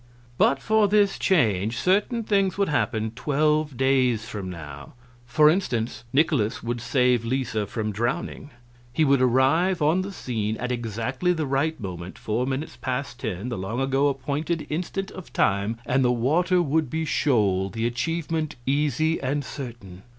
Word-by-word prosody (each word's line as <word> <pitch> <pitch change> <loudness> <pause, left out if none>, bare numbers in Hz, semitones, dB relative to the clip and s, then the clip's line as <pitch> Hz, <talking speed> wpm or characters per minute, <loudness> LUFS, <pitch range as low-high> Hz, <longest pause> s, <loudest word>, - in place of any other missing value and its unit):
"But 135 - +4
for 215 +6 +3
this 205 -1 +2
change 115 - +2
certain 210 +5 +1
things 195 -4 +1
would 200 -3 +1
happen 110 -6 0
twelve 150 +2 0
days 130 -4 +2
from 100 -5 -5
now. 75 -3 -9 0.3
For 150 +4 +5
instance, 120 - 0
Nikolaus 135 -6 +1
would 120 0 -3
save 125 -1 +2
Lisa 115 -4 -1
from 110 +1 -3
drowning. 120 +6 -3 0.4
He 155 +5 +2
would 140 -2 +3
arrive 135 +9 +3
on 155 +5 +3
the 195 +2 -5
scene 110 - -3
at 125 +1 -3
exactly 120 - -1
the 160 -3 -2
right 140 +3 0
moment 90 -3 -7
four 115 +4 -2
minutes 135 +3 -4
past 130 -1 -3
ten, 110 -2 -4
the 120 - -4
long 105 +6 -3
ago 135 +1 +2
appointed 145 +4 -2
instant 180 +4 -3
of 185 - -10
time 100 +4 +1
and 130 +1 +2
the 125 - +3
water 170 +9 +2
would 155 -1 0
be 160 +3 -2
shoal, 100 -11 +1
the 115 +3 -3
achievement 160 +5 -2
easy 150 +3 +1
and 140 +1 -1
certain. 115 -10 -8
130 Hz, 160 wpm, -25 LUFS, 115-155 Hz, 0.4 s, For